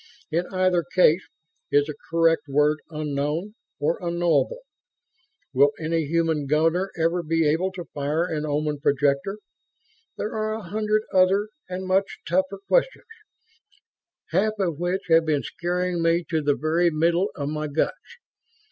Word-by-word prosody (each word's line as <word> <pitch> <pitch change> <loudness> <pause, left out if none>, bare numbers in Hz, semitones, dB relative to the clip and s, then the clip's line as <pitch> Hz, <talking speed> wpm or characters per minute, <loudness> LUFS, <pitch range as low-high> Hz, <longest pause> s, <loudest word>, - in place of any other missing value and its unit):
In 170 +3 0
either 185 -2 +2
case, 180 +2 +4 0.5
is 145 0 +3
the 150 - -5 0.2
correct 165 -1 +2
word 150 +2 +2
'unknown' 150 +5 -2 0.3
or 155 +3 0
'unknowable'? 175 - 0 0.9
Will 140 +2 +4
any 165 0 0
human 160 -2 0
gunner 165 +6 +2
ever 165 +2 +1
be 165 -1 +1
able 170 +6 +1
to 175 -2 -7
fire 150 +4 0
an 155 -4 -3
Oman 150 0 -1
projector? 140 +7 +1 0.8
There 210 - -3
are 215 0 -1
a 220 - -7
hundred 215 +3 0
other 190 +3 +3 0.2
and 185 +1 -4
much 190 +1 +1
tougher 185 +3 0
questions, - - +1 1.3
half 205 +6 +2
of 170 -6 -1
which 180 +2 -1
have 165 0 +5
been 150 -3 +1
scaring 175 +1 -2
me 165 +1 +2
to 160 -1 +1
the 145 -1 +2
very 160 +5 +2
middle 170 +5 +1
of 140 0 -3
my 155 0 -3
guts. 160 - -3
165 Hz, 145 wpm, -24 LUFS, 150-185 Hz, 1.3 s, have